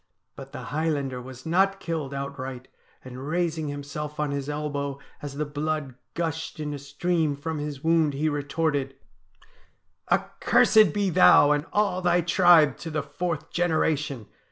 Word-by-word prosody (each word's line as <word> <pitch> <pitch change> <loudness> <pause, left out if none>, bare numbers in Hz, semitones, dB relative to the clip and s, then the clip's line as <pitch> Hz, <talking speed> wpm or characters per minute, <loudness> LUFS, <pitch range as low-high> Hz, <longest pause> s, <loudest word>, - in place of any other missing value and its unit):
But - - -10
the - - -7
Highlander 145 -5 -1
was 130 0 -11
not 195 +4 +2
killed 160 -5 -3
outright, 135 -2 -6 0.4
and, 130 +2 -8
raising 165 -1 -1
himself 145 +1 -6
on 150 -1 0
his 140 0 -3
elbow 145 -2 -3 0.2
as 145 -1 -6
the 150 +1 -2
blood 150 -1 -3 0.2
gushed 160 -2 -3
in 150 -1 -3
a 145 - -5
stream 160 +1 -1
from 155 +2 -4
his 145 -2 -5
wound, 160 -3 +2
he 150 +3 0
retorted: 145 -1 -1 0.4
' - - -30
" - - -28
Accursed 215 -6 +4
be 200 0 0
thou 145 - +7
and 150 +1 0
all 200 -3 +1
thy 175 0 +3
tribe 170 -4 +5
to 165 - -6
the 155 -1 -2
fourth 155 +2 -4
genera 160 -2 +2
tion 140 -6 -6
150 Hz, 160 wpm, -26 LUFS, 140-165 Hz, 0.4 s, thou